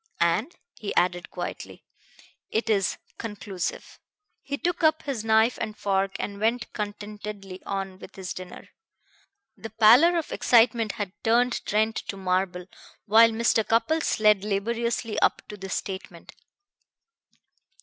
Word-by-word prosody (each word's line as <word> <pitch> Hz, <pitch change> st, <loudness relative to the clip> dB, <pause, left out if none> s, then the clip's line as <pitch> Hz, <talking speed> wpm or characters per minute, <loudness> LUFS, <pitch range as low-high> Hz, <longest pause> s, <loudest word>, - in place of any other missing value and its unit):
And," 170 Hz, -, +1 dB, 0.2 s
he 210 Hz, -, -4 dB
added 175 Hz, 0 st, +1 dB
quietly, -, -, -7 dB, 0.6 s
"it 225 Hz, 0 st, 0 dB
is 195 Hz, -3 st, +1 dB, 0.2 s
conclusive." 205 Hz, -4 st, -5 dB, 0.4 s
He 280 Hz, 0 st, -4 dB
took 345 Hz, +2 st, -2 dB
up 315 Hz, 0 st, +3 dB
his 265 Hz, -7 st, -3 dB
knife 220 Hz, +2 st, +3 dB
and 215 Hz, -1 st, -4 dB
fork 195 Hz, -1 st, 0 dB
and 200 Hz, -1 st, -4 dB
went 235 Hz, +3 st, -1 dB
contentedly 205 Hz, -2 st, -6 dB
on 195 Hz, -1 st, -4 dB
with -, -, -12 dB
his 190 Hz, -2 st, -5 dB
dinner. 180 Hz, -1 st, -10 dB, 0.9 s
The 225 Hz, -, -8 dB
pallor 235 Hz, +11 st, +6 dB
of 325 Hz, -, -3 dB
excitement 230 Hz, -2 st, +3 dB
had 205 Hz, -3 st, -4 dB
turned 240 Hz, +2 st, +2 dB
Trent 220 Hz, +1 st, +1 dB
to 195 Hz, -, -5 dB
marble 185 Hz, -1 st, -1 dB, 0.4 s
while 225 Hz, +2 st, +7 dB
Mr. 225 Hz, 0 st, +2 dB
Cupples 290 Hz, +9 st, +1 dB
led 210 Hz, -2 st, +4 dB
laboriously 225 Hz, +2 st, -1 dB
up -, -, +2 dB
to 210 Hz, -, -7 dB
this 195 Hz, -2 st, -5 dB
statement. 190 Hz, -3 st, -6 dB
215 Hz, 130 wpm, -26 LUFS, 195-230 Hz, 0.9 s, while